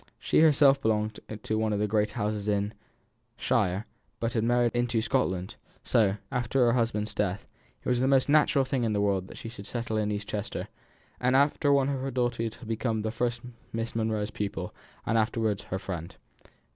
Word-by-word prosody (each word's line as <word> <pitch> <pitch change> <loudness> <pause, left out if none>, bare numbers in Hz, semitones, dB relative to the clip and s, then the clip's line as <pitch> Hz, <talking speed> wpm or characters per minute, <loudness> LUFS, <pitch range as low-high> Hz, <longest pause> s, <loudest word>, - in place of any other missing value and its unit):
She - - +2
herself 145 -3 +6
belonged 110 -2 0 0.2
to 110 - -1
one 110 -1 +1
of - - 0
the 105 - +1
great 105 0 +1
houses 105 -2 -2
in 105 0 0 0.6
shire, 95 +4 +1 0.3
but 115 0 -1
had 110 - +1
married 120 0 +3
into 120 -1 +1
Scotland; 110 -6 -1 0.3
so, 100 -3 +3 0.2
after 125 0 +2
her 120 - +4
husband's 115 -3 0
death, 95 -1 -1 0.4
it - - -7
was 125 -1 +2
the 130 - +2
most 135 -1 +4
natural 145 -2 +4
thing 130 -1 -1
in 110 -2 +1
the 105 - +1
world 100 -2 +1
that - - -11
she - - -7
should 105 -3 -9
settle 115 -1 -3
in 105 -1 0
East 105 0 -3
Chester; 105 -1 -4 0.5
and 125 +1 +2
one 135 - +7
after 145 0 0
another 140 0 +3
of - - -5
her 135 - -2
daughters 120 -3 -1
had 120 -1 -12
become 110 -1 -1
first 120 +2 -1 0.3
Miss 115 0 -3
Monro's 110 -2 -1
pupil 100 -3 -4 0.3
and 115 - +2
afterwards 110 -2 0
her 95 - -3
friend. 90 -4 -6
115 Hz, 195 wpm, -28 LUFS, 105-125 Hz, 0.6 s, one